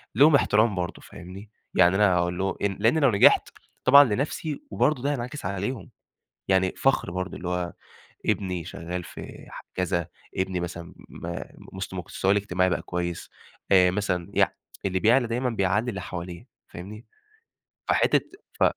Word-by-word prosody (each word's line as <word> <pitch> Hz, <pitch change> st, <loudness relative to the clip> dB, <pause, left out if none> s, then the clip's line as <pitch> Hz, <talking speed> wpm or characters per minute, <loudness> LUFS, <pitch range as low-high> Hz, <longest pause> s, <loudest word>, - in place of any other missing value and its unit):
ليهم 145 Hz, +5 st, +7 dB
احترام 110 Hz, -4 st, +3 dB
برضه 90 Hz, -2 st, -4 dB
فاهمني؟ 95 Hz, +5 st, -11 dB, 0.3 s
يعني 90 Hz, 0 st, +5 dB
أنا 100 Hz, -2 st, +4 dB
أقول 90 Hz, 0 st, 0 dB
له 95 Hz, -1 st, -1 dB
أ -, -, +1 dB
لإنّي 110 Hz, +9 st, +1 dB
لو 140 Hz, -4 st, +4 dB
نجحت 100 Hz, -, +5 dB, 0.4 s
طبعًا 140 Hz, +2 st, +9 dB
لنفسي 140 Hz, +5 st, -2 dB
وبرضه 125 Hz, +6 st, +1 dB
ده 145 Hz, -, +1 dB
هينعكس 125 Hz, -1 st, -4 dB
عليهم، 100 Hz, +7 st, -3 dB, 0.6 s
يعني 95 Hz, -1 st, +3 dB
فَخر 135 Hz, -8 st, +1 dB
برضه 90 Hz, 0 st, -4 dB
اللي 90 Hz, -, -5 dB
هو، 90 Hz, -1 st, -2 dB, 0.5 s
ابني 90 Hz, -4 st, -1 dB
شغّال 90 Hz, 0 st, -5 dB
في -, -, -10 dB
ح -, -, -9 dB
كذا، 90 Hz, -2 st, -1 dB, 0.3 s
ابني 95 Hz, -1 st, -1 dB
مثلًا 85 Hz, -1 st, -6 dB, 0.2 s
ما -, -, -6 dB
مست -, -, -7 dB
مستواه 95 Hz, -, -1 dB
الاجتماعي 95 Hz, -2 st, +1 dB
بقى -, -, -1 dB
كويس، 85 Hz, -1 st, -4 dB, 0.4 s
آآ 90 Hz, -2 st, +6 dB
مثلًا 95 Hz, -3 st, -2 dB
يع -, -, +4 dB, 0.4 s
اللي 95 Hz, -1 st, 0 dB
بيعلَى 120 Hz, +5 st, +4 dB
دايمًا 125 Hz, +2 st, -1 dB
بيعلّي 105 Hz, +1 st, 0 dB
اللي 100 Hz, -4 st, -4 dB
حواليه 85 Hz, -1 st, -7 dB, 0.2 s
فاهمني؟ 105 Hz, +7 st, -10 dB, 0.8 s
فحتّة -, -, +3 dB, 0.3 s
ف -, -, 0 dB
95 Hz, 155 wpm, -26 LUFS, 90-115 Hz, 0.8 s, طبعًا